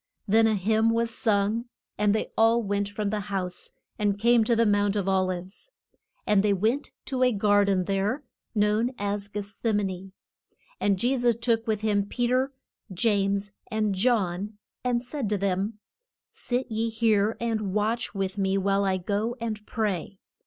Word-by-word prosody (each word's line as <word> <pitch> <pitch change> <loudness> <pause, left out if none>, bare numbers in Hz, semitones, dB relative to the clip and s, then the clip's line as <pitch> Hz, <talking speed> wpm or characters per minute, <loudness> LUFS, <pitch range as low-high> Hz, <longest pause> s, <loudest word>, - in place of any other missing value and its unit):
Then 225 +2 +5
a 220 - +2
hymn 220 +3 +2
was 230 0 +1
sung 215 +1 +1 0.3
and 210 0 +2
they 220 - -2
all 230 +1 +4
went 200 0 -1
from 205 0 -2
the 215 - -1
house, 195 -3 -4 0.3
and 205 -1 +1
came 235 +2 +4
to 235 - +3
the 230 0 +3
Mount 205 -1 +2
of 200 -2 -1
Ol 190 -1 +2
ives. 185 - -6 0.6
And 210 -2 +4
they 205 -1 +3
went 225 +9 0 0.2
to 260 -2 -3
a 250 0 +5
gar 205 -1 +3
den 195 -2 +2
there, 200 +9 -1 0.3
known 215 +4 +2
as 205 0 -2
Geth 205 0 -4
sem 210 +1 -1
a - - -1
ne. 190 0 -5 0.7
And 200 -1 +2
Je 245 +7 +1
sus 240 -2 +3
took 230 -1 +1
with 215 -2 0
him 205 -2 +1
Pe 245 +3 -1
ter, 255 +3 +1 0.4
James, 200 0 +1 0.2
and 215 -2 0
John, 205 -2 0 0.3
and 245 -1 0
said 255 -3 -3
to 210 - +1
them, 200 +2 -1 0.5
Sit 245 0 -3
ye 225 +1 0
here 220 -1 +2
and 220 -4 -1
watch 215 +3 -1
with 195 0 -2
me 195 0 +1
while 195 +1 +1
I 190 -1 +1
go 205 +6 -1
and 220 -2 -4
pray. 200 -4 -2
210 Hz, 180 wpm, -26 LUFS, 200-230 Hz, 0.7 s, Then